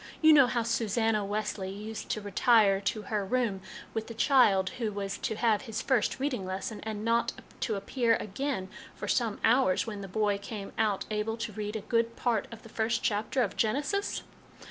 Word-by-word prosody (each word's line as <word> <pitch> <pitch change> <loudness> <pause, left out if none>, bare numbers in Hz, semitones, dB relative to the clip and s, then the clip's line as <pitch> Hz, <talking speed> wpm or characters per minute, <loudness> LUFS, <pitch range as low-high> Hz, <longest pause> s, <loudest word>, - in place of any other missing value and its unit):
You 315 -1 +7
know 275 -4 +7
how 235 -1 0
Susanna 225 -1 +1
Wesley 205 -1 -3
used 210 +3 -7
to 215 - -1
retire 205 0 +4
to 210 +1 -2
her 210 -2 -1
room 210 -2 0 0.3
with 220 -1 -3
the 230 - -8
child 215 -8 +4
who 225 -3 -1
was 200 -1 -4
to 220 - -2
have 220 -2 +2
his 225 -4 -4
first 260 -3 +1
reading 265 -7 -1
lesson, 190 +3 -4
and 215 0 -5
not 235 +2 +2 0.3
to 220 - -1
appear 230 +4 +1
again 210 -1 -3 0.3
for - - -6
some 230 -4 0
hours, 230 -5 +3
when 210 -3 -5
the 195 - -6
boy 205 +1 0
came 205 -2 -7
out 215 -3 +1
able 215 +1 -1
to 230 - -4
read 210 0 -4
a 220 - -2
good 230 +2 0
part 235 -4 0
of 230 - -10
the - - -11
first 225 +1 -1
chapter 220 +4 +1
of 205 - -3
Genesis? 285 - 0
220 Hz, 190 wpm, -29 LUFS, 205-235 Hz, 0.3 s, You